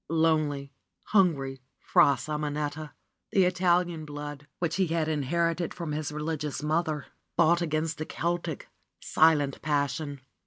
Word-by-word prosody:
Lonely, 155 -4 +1 0.4
hungry 140 -10 +2 0.2
Fra 140 -1 +4
Simonetta! 150 0 -3 0.4
The 195 - +5
Italian 180 -2 +2
blood, 145 -1 -7
which 170 0 -1
he 190 -2 +2
had 165 -1 0
inherited 165 +3 0
from 170 -3 -4
his 150 0 -2
religious 150 -1 -3
mother, 155 -1 0 0.3
fought 170 +2 +4
against 155 -1 -1
the 155 - -2
Celtic, 170 -2 -2 0.3
silent 150 -4 +3
pas 145 -2 +1
sion. 140 -1 -5
155 Hz, 125 wpm, -28 LUFS, 145-170 Hz, 0.4 s, The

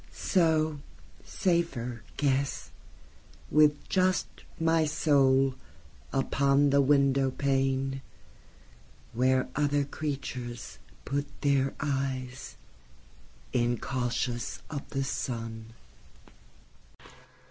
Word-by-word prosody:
So, 160 -4 +1 0.4
safer, 135 - -1 0.2
guess, 140 -1 0 0.8
with 150 -1 +4
just 185 0 +2 0.3
my 165 -1 +3
soulUpon 140 -1 +1
the 140 0 +5
window 140 -1 +3
paneWhere 135 0 0 1.5
other 145 0 +2
creatures 130 -5 -5 0.3
put 145 +1 -1
their 140 -1 +2
eyes, 135 -2 -3 1.0
Incautious 120 -1 -1
of 145 -2 -5
the 135 -1 -1
sun. 115 -4 -4
135 Hz, 65 wpm, -29 LUFS, 130-145 Hz, 1.5 s, the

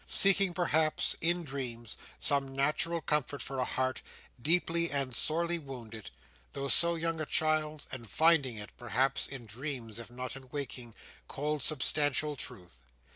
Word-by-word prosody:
Seeking, 195 -2 +5
perhaps—in 165 +1 +2
dreams—some 135 +1 -1
natural 155 +4 +1
comfort 145 -2 0
for 135 -1 -5
a - - +2
heart, 130 +1 -1 0.4
deeply 170 +3 +2
and 135 -3 -1
sorely 170 +4 0
wounded, 115 -7 -8 0.4
though 140 0 -3
so 170 +3 +5
young 165 -1 -1
a - - -1
child's: 155 -2 +1
and 120 -4 -7
finding 150 - +3
it, 105 -1 -8
perhaps, 125 +3 +1
in 135 -4 -7
dreams, 120 -1 -5
if 115 - -8
not 125 +1 -5
in 130 -1 -11
waking, 125 -5 -5 0.3
cold, 150 +1 -2
substantial 150 +1 +2
truth. 90 - -7
140 Hz, 135 wpm, -32 LUFS, 125-155 Hz, 0.4 s, Seeking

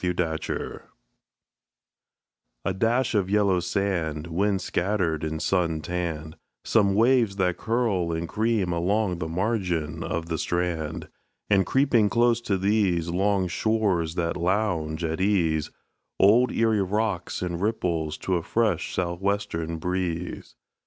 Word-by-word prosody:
ERIE 90 -1 0
WATERS 80 -2 -3 1.8
A 95 - +1
dash 115 +7 +1
of 100 -3 +1
yellow 100 -3 +3
sand, 90 -4 -1
Wind 95 +4 0
scattered 90 -6 -1
and 80 0 -2
sun 85 -4 +1
tanned; 80 -1 -4 0.3
Some 100 -3 +3
waves 115 -2 +3
that 90 -2 0
curl 110 -7 0
and 80 +1 -2
cream 110 -3 0
along 90 +1 0
the 80 - -3
margin 85 -5 -1
of 85 0 -3
the 80 -1 -3
strand; 85 -3 -2 0.4
And, 95 -2 +4
creeping 130 -6 +3
close 120 +1 +3
to 100 -4 0
these 95 -4 +1
Long 95 +1 +1
shores 95 -4 0
that 85 -2 -1
lounge 85 -4 0
at 80 +2 -2
ease, 85 -6 +1 0.5
Old 115 +5 +5
Erie 110 -2 +2
rocks 100 -2 -1
and 85 -1 -3
ripples 85 -7 -1
to 95 -2 +1
a - - -2
fresh 100 -1 0
sou' 85 -1 -1
western 85 -4 -2
breeze. 90 0 -3
90 Hz, 130 wpm, -25 LUFS, 85-105 Hz, 1.8 s, Old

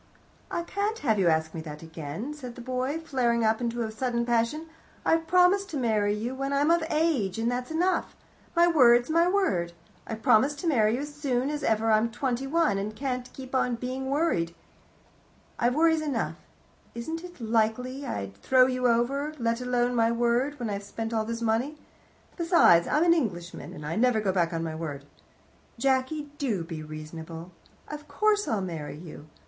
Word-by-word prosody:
"I 340 - -2
can't 405 +5 -2
have 220 -7 +1
you 185 - +3
ask 160 -1 +1
me 165 - -5
that 150 0 -9
again," 160 - -6
said 250 -5 -9
the 245 - -9
boy, 255 +4 -2
flaring 245 -7 0
up 220 +2 +2
into 235 0 -1
a 220 - -4
sudden 235 +1 -1
passion. 240 +7 0 0.4
"I've 325 0 +2
promised 365 +3 +4
to 310 - -3
marry 215 -5 +1
you 230 +4 -3
when 275 +1 -3
I'm 290 +3 +3
of 340 -1 +3
age, 300 - +1
and 230 +2 0
that's 250 0 -3
enough. 350 +4 0 0.4
My 340 0 +6
word's 245 -5 +5
my 335 +2 +4
word. 195 - +1 0.3
I've 225 0 -6
promised 275 +7 +4
to 350 - -3
marry 225 -7 +3
you 260 - -3
as 295 0 -6
soon 275 -2 -1
as 300 0 -3
ever 225 0 +1
I'm 215 +2 +3
twenty 255 +2 -2
one, 275 -10 +2
and 205 +2 -3
I - - -19
can't 250 0 -3
keep 265 -1 -10
on 250 -2 +1
being 255 +2 -4
worried. 270 - 0 1.0
I've 240 +2 +2
worries 320 0 +3
enough. 285 -7 -2 0.6
It 235 - -4
isn't 330 +6 -6
likely 230 +4 0
I'd 100 - -5
throw 255 - +4
you 255 -1 +1
over, 275 +6 0
let 230 -1 -1
alone 245 0 +1
my 230 -1 +3
word, 240 +4 +1
when 235 -3 -3
I've 200 0 -3
spent 225 +3 -5
all 220 -1 0
this 230 +1 -4
money. 235 +7 0 0.6
Besides, 335 - +5
I'm 300 - +2
an 340 -1 +6
Englishman, 180 - -3
and 150 - -9
I 155 - -3
never 245 -1 +3
go 205 -3 0
back 175 -3 +1
on 165 -1 -2
my 160 -1 -3
word. 150 -3 -6 0.7
Jacky, 270 +4 0
do 220 -11 -1
be 165 -1 -6
reasonable. 160 +2 -8 0.4
Of 300 0 -8
course 415 +7 +1
I'll 215 -3 0
marry 160 -5 -5
you. 155 -2 -11
245 Hz, 190 wpm, -27 LUFS, 215-290 Hz, 1.0 s, My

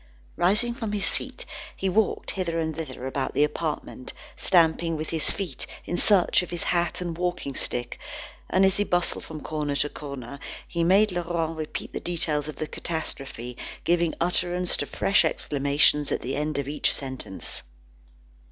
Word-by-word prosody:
Rising 215 +7 +3
from 225 -4 -4
his 205 -1 0
seat, - - +1 0.3
he 195 - -1
walked 205 +3 +1
hither 170 -3 -1
and 160 -1 -1
thither 130 -5 -5
about 135 0 -2
the 145 - +5
apartment, 150 -3 -3 0.2
stamping 165 -2 +3
with 155 +1 -4
his 160 -2 +2
feet, 170 -10 -4 0.2
in 175 - -2
search 190 -1 +4
of 180 - -6
his 175 -1 -1
hat 175 0 0
and 170 -2 -3
walking 175 -5 -2
stick; 120 -2 -1 0.5
and, 190 +1 +5
as 190 - +4
he 205 - +3
bustled 175 -3 +2
from 155 -2 -7
corner 150 -2 -2
to 145 +1 +2
corner, 140 -3 -7 0.3
he 170 -1 0
made 195 +4 +5
Laurent 170 -2 -1
repeat 155 -1 -5
the - - -2
details 155 -4 0
of 155 - -5
the 155 - -3
catastrophe, 135 -7 -5 0.3
giving 170 -1 +2
utterance 180 +1 +2
to - - -2
fresh 195 -2 +3
exclamations 145 -1 +3
at - - 0
the 130 +2 -2
end 150 0 -1
of 140 -1 -1
each 150 +1 +2
sentence. 130 -8 -4
165 Hz, 170 wpm, -26 LUFS, 145-180 Hz, 0.5 s, the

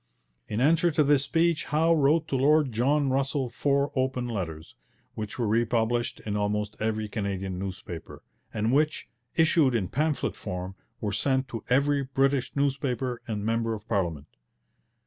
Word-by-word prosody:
In 105 - -2
answer 165 +6 +4
to 150 - +4
this 140 -1 +3
speech 165 +2 +1
Howe 160 +3 +3
wrote 155 +1 +3
to - - 0
Lord 145 +1 +3
John 135 +5 +2
Russell 135 -1 0
four 140 +3 +1
open 130 -2 0
letters, 85 -8 -5 0.4
which 105 -1 -6
were 120 -3 0
republished 115 +1 +1
in 105 -1 -2
almost 105 0 -1
every 110 0 -1
Canadian 95 -3 -3
newspaper, 95 -3 -7 0.3
and 110 +3 0
which, 150 +2 +1 0.3
issued 160 -5 +4
in 95 -6 0
pamphlet 155 0 0
form, 90 -1 -5 0.3
were 105 - -1
sent 130 +5 +1
to 115 -3 -6
every 140 +2 +3
British 135 0 +1
newspaper 135 -3 -1
and 105 -2 -3
member 115 0 0
of 105 +1 -11
parliament. 85 -10 -1
125 Hz, 150 wpm, -27 LUFS, 105-140 Hz, 0.4 s, answer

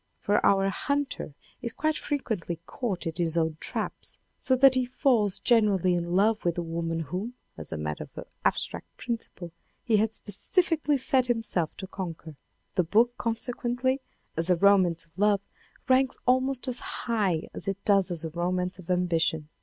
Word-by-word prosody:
For 205 +1 +1
our 195 0 +4
hunter 280 - -2 0.3
is 235 -2 -4
quite 310 0 0
frequently 220 - -3
caught 200 -8 -3
in 165 - -2
his 170 -2 0
own 160 -1 +1
traps, - - -3 0.2
so 260 - +2
that 265 +1 +7
he 255 -1 +2
falls 245 -6 +2
genuinely 205 -6 +3
in 175 0 -1
love 210 +3 +3
with 175 -1 +1
the 175 - -2
woman 165 0 -2
whom, 190 - -4 0.2
as 80 -2 -9
a - - -3
matter 75 0 -4
of - - -6 0.2
abstract - - -1
principle, 225 -7 -5 0.3
he 225 -3 +3
had 220 +1 +2
specifically 300 - +1
set 255 -1 +2
himself 225 -9 0
to 190 - -5
conquer. 165 -5 -7 0.4
The 180 - +2
book 230 +8 +3
consequently 245 +3 -1 0.3
as 165 +2 -1
a 180 - +5
romance 180 -3 +4
of 165 +3 -19
love, 205 -1 +4 0.5
ranks 260 0 +3
almost 260 +1 +2
as 250 -1 -1
high 200 -9 -1
as - - -3
it 195 -1 -1
does 195 -3 +4
as 170 -2 -2
a 160 - -4
romance 180 +2 -1
of 185 - -12
ambition. 165 -4 +1
200 Hz, 170 wpm, -28 LUFS, 170-245 Hz, 0.5 s, that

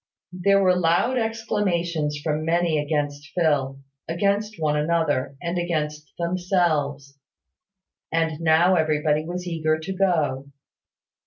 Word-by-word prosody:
There 195 +2 +3
were 185 -1 +4
loud 180 +9 +2
exclamations 180 -9 -1
from 155 -1 -1
many 165 -1 +1
against 145 -1 -2
Phil, 140 -5 +1 0.3
against 200 +5 0
one 150 -2 +1
another, 150 -3 0
and 175 +1 -1
against 150 -3 -3
themselves; 170 -6 -1 0.9
and 160 -1 0
now 165 +3 +4
everybody 155 -2 +1
was 180 +2 -5
eager 155 -2 0
to 160 +5 -5
go. 155 -8 0
165 Hz, 110 wpm, -24 LUFS, 150-180 Hz, 0.9 s, were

